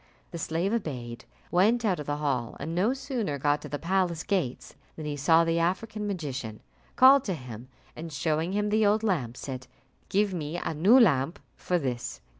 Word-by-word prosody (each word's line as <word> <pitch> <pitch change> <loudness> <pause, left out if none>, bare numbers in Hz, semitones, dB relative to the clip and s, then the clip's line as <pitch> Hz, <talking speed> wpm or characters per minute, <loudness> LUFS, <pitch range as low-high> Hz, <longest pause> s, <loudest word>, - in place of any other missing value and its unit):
The 170 - -6
slave 170 +6 -1
obeyed, 125 - -4 0.3
went 220 +6 +3
out 185 -6 +1
of 150 - -6
the 145 0 -1
hall, 135 -6 -2
and 155 +4 -4
no 190 +7 +2
sooner 255 - -3
got 145 +2 +1
to - - -8
the 145 - -3
palace 175 0 0
gates 175 - -2 0.2
than 155 - -7
he 150 -1 -3
saw 160 +4 +4
the 165 0 +1
African 205 +5 -1
magician, 135 - -5 0.3
called 265 +1 +7
to 190 - -1
him, 125 -4 -9 0.3
and 165 +1 -7
showing 160 +4 -1
him 210 +1 0
the 215 +1 +2
old 210 +1 +3
lamp, 135 - -1
said, 130 -2 -6 0.4
"Give 200 0 +1
me 160 -1 -4
a 170 - -3
new 195 - +6
lamp 165 - +3 0.2
for 180 - -1
this." 120 - -4
165 Hz, 190 wpm, -27 LUFS, 140-200 Hz, 0.4 s, called